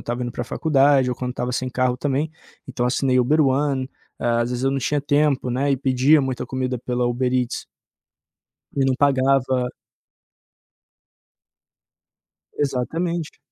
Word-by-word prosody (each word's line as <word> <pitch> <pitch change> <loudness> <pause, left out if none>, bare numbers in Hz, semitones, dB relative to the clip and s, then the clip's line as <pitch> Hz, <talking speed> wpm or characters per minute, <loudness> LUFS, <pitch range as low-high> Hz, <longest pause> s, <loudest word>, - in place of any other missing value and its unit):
estava 120 +1 -4
indo 120 - -3
pra 120 0 -4
faculdade 140 -1 +3
ou 125 - -2
quando 125 +1 -3
estava 125 0 -3
sem 130 +1 -2
carro 125 -1 0
também, 145 +3 -1 0.4
então 125 -2 -2
assinei 130 +1 +1
Uber 140 +6 +3
One. 135 -1 +1 0.3
Ah, 120 -1 +1
às 120 - -3
vezes 125 +1 -2
eu 135 - +3
não 135 - -1
tinha 145 +2 0
tempo, 145 -2 +1
né, 135 +4 0
e 135 - +2
pedia 135 +3 +4
muita 130 -2 -3
comida 130 -1 -2
pela 125 +1 -1
Uber 125 +1 0
Eats. 125 -2 -1 1.1
E 135 -1 +1
não 135 - +2
pagava 130 -2 +2 2.9
Exatamente. 160 +5 -2
130 Hz, 145 wpm, -22 LUFS, 125-140 Hz, 2.9 s, pedia